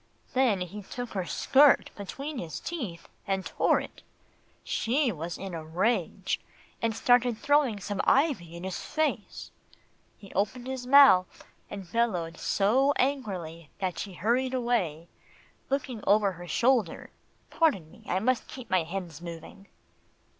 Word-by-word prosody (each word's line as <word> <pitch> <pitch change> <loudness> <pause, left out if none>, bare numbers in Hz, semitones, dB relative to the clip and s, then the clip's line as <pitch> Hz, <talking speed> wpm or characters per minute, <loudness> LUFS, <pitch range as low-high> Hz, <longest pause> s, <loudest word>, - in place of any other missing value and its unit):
Then 250 -7 +2
he 185 +4 -5
took 245 +4 -7
her 185 -3 -3
skirt 280 +1 +4
between 275 +8 -6
his 160 -3 -5
teeth, 230 - -6 0.2
and 195 -1 -1
tore - - +2
it. - - -9 0.6
She 255 +2 +1
was 170 -1 -5
in 195 -2 -6
a 165 -1 -5
rage, 180 +10 -1 0.4
and 230 -1 0
started 245 0 +3
throwing 285 -5 +2
some 200 0 -3
ivy 265 - +2
in 170 - -8
his 190 -1 -4
face. 295 -9 -2 0.7
He 195 - -14
opened 215 +5 -1
his 260 -1 -5
mouth, 265 -10 +6 0.3
and 195 -4 -8
bellowed 180 -8 0
so 260 +8 +2
angrily, 185 - -2
that 185 -2 -3
she 195 - -5
hurried 250 +8 +1
away, 195 -11 -1 0.6
looking 265 -5 -2
over 205 0 +4
her 175 -1 -10
shoulder 230 0 +1 0.4
Pardon 195 - +1
me, - - -17
I 185 - 0
must 250 +5 0
keep 255 -3 -10
my 185 -1 +4
hens 170 -1 -6
moving." 170 +3 -9
205 Hz, 140 wpm, -28 LUFS, 180-255 Hz, 0.7 s, mouth